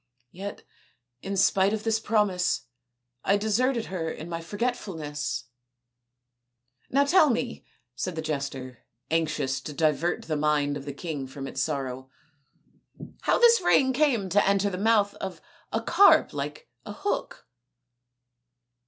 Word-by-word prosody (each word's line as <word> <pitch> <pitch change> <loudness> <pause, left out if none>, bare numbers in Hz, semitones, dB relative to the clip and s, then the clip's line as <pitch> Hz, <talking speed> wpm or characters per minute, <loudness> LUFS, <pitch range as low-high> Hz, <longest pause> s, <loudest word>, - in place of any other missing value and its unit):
Yet, 200 +3 -7 0.6
in 195 0 -4
spite 195 +1 +3
of 215 -1 -3
this 225 -1 +1
promise, 210 -5 +1 0.6
I 200 - +3
deserted 230 +3 +1
her 170 -4 -3
in 160 +1 -7
my 165 -1 -4
forgetfulness." 170 -7 -3 0.7
" 125 0 -47
Now 280 +2 +3
tell 310 0 +5
me," 240 0 -2 0.3
said 180 +7 -4
the 160 - -4
jester, 140 -5 -4 0.3
anxious 150 -5 0
to 150 - -7
divert 160 +3 +1
the 155 - -2
mind 145 -1 +1
of 140 -1 -7
the 145 - -4
king 145 -2 -5
from 135 +1 -7
its - - -3
sorrow, 130 -3 -3 0.6
" - - -17
how - - +4
this 470 -3 +6
ring 265 -6 +4
came 255 -8 +2
to 200 +3 +4
enter 200 0 +2
the 180 - -4
mouth 205 -1 +3
of 190 -1 -6 0.3
a - - -1
carp 400 - +5
like 470 +2 -5 0.2
a - - -7
hook 405 - -3
180 Hz, 145 wpm, -27 LUFS, 145-220 Hz, 0.7 s, this